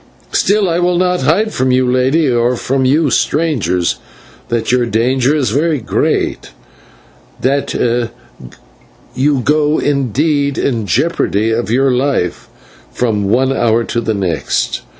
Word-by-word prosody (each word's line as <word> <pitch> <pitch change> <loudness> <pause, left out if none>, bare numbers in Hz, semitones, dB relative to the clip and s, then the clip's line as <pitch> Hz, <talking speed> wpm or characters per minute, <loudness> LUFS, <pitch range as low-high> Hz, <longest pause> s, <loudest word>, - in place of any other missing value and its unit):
Still, 205 -1 +2
I 170 0 0
will 175 0 +1
not 180 -2 +1
hide 195 +11 +1
from 130 +1 0
you, 130 0 +2
Lady, 130 +5 +2
or 120 0 +1
from 130 +2 -1
you, 145 +2 +2
strangers, 135 - 0 0.5
that 115 0 -1
your 125 -1 +2
danger 125 +5 +1
is 130 -8 0
very 150 +3 0
great, 110 - -1 0.9
that 140 +2 -1 1.4
you 135 +1 +1
go, 150 +3 +1
indeed, 140 +1 0
in 115 -6 -1
jeopardy 110 - 0
of 115 0 -1
your 130 +3 +2
life 125 -9 -1 0.4
from 105 -5 -1
one 130 +4 +2
hour 115 -2 +1
to 120 +1 -2
the 110 -1 -2
next." 90 -6 -2
130 Hz, 130 wpm, -15 LUFS, 115-150 Hz, 1.4 s, Still